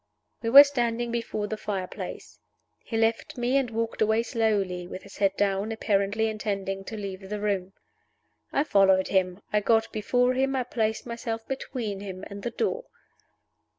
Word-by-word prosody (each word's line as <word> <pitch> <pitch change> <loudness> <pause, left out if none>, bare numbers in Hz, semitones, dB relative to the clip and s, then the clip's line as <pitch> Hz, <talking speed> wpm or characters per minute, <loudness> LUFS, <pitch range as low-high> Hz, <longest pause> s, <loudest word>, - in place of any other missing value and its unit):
We 230 - -1
were 280 +4 +12
standing 240 -4 -1
before 230 -3 -2
the 215 +1 -4
fire 195 -3 -3
place. - - -8 0.4
He 225 - -4
left 225 +2 0
me, 245 +2 +1
and 270 -3 +2
walked 225 0 -3
away 220 +1 +3
slowly 205 -6 0
with 185 - -8
his 200 - -13
head 195 -1 +1
down, 200 +1 +1
apparently 215 0 +1
intending 200 -3 -3
to 220 - -6
leave 195 -2 -6
the 210 0 -3
room. 195 -2 -1 0.8
I 280 - +2
followed 190 -7 +4
him 185 0 0
I 210 - +4
got 225 +2 +2
before 245 +4 +2
him 270 +1 +1
I 260 - +1
placed 220 -3 -1
myself 230 -1 -5
between 240 -6 -4
him 190 -1 -7
and 200 0 -7
the 240 - -2
door. 460 - -2
220 Hz, 170 wpm, -27 LUFS, 195-235 Hz, 0.8 s, were